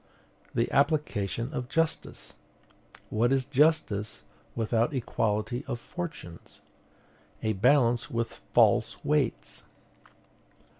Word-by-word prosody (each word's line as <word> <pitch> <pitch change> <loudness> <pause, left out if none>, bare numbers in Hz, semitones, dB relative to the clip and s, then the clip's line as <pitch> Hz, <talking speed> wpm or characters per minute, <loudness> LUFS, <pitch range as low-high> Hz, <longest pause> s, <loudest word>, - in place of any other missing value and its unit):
"The - - +1
application 140 - 0
of 125 -4 -4
justice." 165 +2 -2 0.8
What 115 +3 +2
is 135 -1 +2
justice 140 -7 +1 0.3
without 115 +4 +1
equality 115 -1 -1
of 120 - -3
fortunes? 155 - -8 0.8
A 110 - +1
balance 120 +2 +3
with 115 -1 -3
false - - +3
weights. 150 -4 -1
120 Hz, 90 wpm, -28 LUFS, 110-145 Hz, 0.8 s, balance